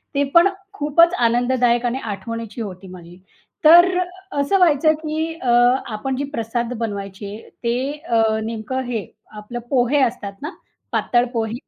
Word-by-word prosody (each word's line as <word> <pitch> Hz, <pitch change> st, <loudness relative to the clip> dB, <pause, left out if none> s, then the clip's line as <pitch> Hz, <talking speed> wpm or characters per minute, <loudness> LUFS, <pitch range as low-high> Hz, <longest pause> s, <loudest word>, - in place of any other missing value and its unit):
ते 280 Hz, -, +2 dB
पण 340 Hz, +2 st, +7 dB, 0.3 s
खूपच 335 Hz, +1 st, +3 dB
आनंददायक 240 Hz, -1 st, +2 dB
आणि 245 Hz, +2 st, -1 dB
आठवणीची 230 Hz, +1 st, -6 dB
होती 190 Hz, -2 st, -7 dB
माझी. 175 Hz, -1 st, -12 dB, 0.5 s
तर 345 Hz, +3 st, +9 dB, 0.5 s
असं 280 Hz, +8 st, +2 dB
व्हायचं 315 Hz, -3 st, +4 dB
की 315 Hz, +1 st, -2 dB
अ, 250 Hz, -, -1 dB, 0.4 s
आपण 260 Hz, +5 st, -3 dB
जे 280 Hz, -, -2 dB
प्रसाद 235 Hz, +1 st, -2 dB
बनवायचे, 200 Hz, -2 st, -5 dB, 0.3 s
ते 235 Hz, 0 st, 0 dB, 0.3 s
अ, 230 Hz, -1 st, +3 dB, 0.2 s
नेमकं 230 Hz, +3 st, -4 dB
हे 230 Hz, -4 st, -3 dB, 0.3 s
आपलं 235 Hz, +3 st, -7 dB
पोहे 265 Hz, +2 st, +2 dB
असतात 230 Hz, -6 st, -1 dB
ना, 300 Hz, -, -4 dB, 0.4 s
पातळ 240 Hz, 0 st, +2 dB
पोहे? 225 Hz, -1 st, -2 dB
240 Hz, 140 wpm, -20 LUFS, 220-280 Hz, 0.5 s, तर